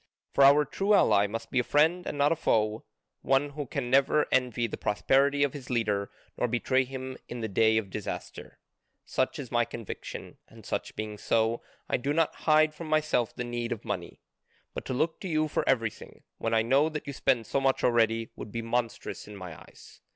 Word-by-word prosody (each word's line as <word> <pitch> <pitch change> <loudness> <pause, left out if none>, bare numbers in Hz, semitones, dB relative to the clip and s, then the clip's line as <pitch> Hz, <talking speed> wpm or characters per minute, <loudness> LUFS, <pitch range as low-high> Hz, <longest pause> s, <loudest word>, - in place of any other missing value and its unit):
For 140 - +5
our 145 +2 +7
true 200 +8 +2
ally 105 - +4
must 115 +2 -6
be 130 - +2
a - - +2
friend 160 +7 +2
and - - -4
not 145 +1 +3
a - - +3
foe, 110 -6 0 0.4
one 135 +2 +2
who 145 -1 -5
can 125 -2 -3
never 140 +3 +4
envy 125 -2 +1
the 115 - -4
prosperity 140 +7 +2
of 145 - 0
his 135 -3 -9
leader 105 -5 0 0.3
nor 125 - +2
betray 130 +2 +1
him 130 0 -6
in 120 0 -5
the 110 - -1
day 110 +2 +3
of 100 -4 -2
disaster. - - -6 0.5
Such - - -1
is - - -7
my - - +3
conviction, - - -8
and - - -16
such - - -4
being 105 -1 -5
so, 115 +2 +1 0.3
I - - +1
do 140 +4 -1
not 165 0 +2 0.2
hide 155 0 +5
from 165 +1 -8
myself 155 -7 +1
the 125 - -3
need 120 0 -4
of 115 - -4
money. 90 -4 -5 0.5
But - - -6
to - - -3
look 160 +5 0
to 190 - -5
you 155 -2 +1
for 150 - -1
everything, 115 -4 -2 0.2
when 115 0 0
I 110 - +3
know 135 +6 +3
that 155 -1 -5
you 140 - -5
spend 130 -3 +1
so 140 - -1
much 135 0 +1
already, 115 -1 +2
would 105 - -8
be 115 +1 -4
monstrous 115 -2 -3
in 105 - -9
my 90 -4 -8
eyes. - - -16
125 Hz, 210 wpm, -28 LUFS, 115-145 Hz, 0.5 s, our